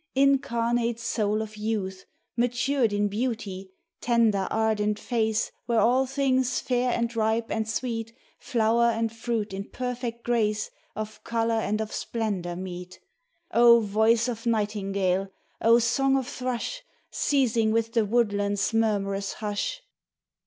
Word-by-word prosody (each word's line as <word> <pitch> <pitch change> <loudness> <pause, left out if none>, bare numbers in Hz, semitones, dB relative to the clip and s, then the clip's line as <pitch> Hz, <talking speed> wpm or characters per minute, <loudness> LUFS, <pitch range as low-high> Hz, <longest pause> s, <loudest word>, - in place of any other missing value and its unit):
Incarnate 240 -4 +2
soul 215 -2 0
of 215 0 -10
youth 205 -3 -3 0.3
Matured 245 +1 +1
in 205 0 +1
beauty, 205 -4 -3 0.3
tender 225 -5 +2
ardent 215 -1 +1
face 220 -2 0 0.2
Where 235 -2 +2
all 255 +4 +3
things 260 -2 +1
fair 250 0 0
and 235 -1 -1
ripe 225 +1 0
and 220 0 -1
sweet, 230 -1 -3 0.3
Flower 235 0 +2
and 225 -1 0
fruit 225 -3 -2
in 195 +1 -4
perfect 245 -2 -4
grace 215 -3 0 0.2
Of 215 0 -6
colour 230 0 0
and 215 -1 0
of 220 -1 -4
splendour, 200 -7 -2
meet. 180 0 -7 0.5
O 235 0 +7
voice 220 +2 +2
of 235 -1 -4
nightingale, 200 -3 0 0.3
O 230 +1 +6
song 270 +4 +2
of 260 -2 -2
thrush 255 - -3 0.3
Ceasing 240 -6 +2
within 230 0 0
the - - -2
woodlands' 205 -2 +1
murmurous 200 -3 0
hush 220 - -3
225 Hz, 130 wpm, -26 LUFS, 210-240 Hz, 0.5 s, O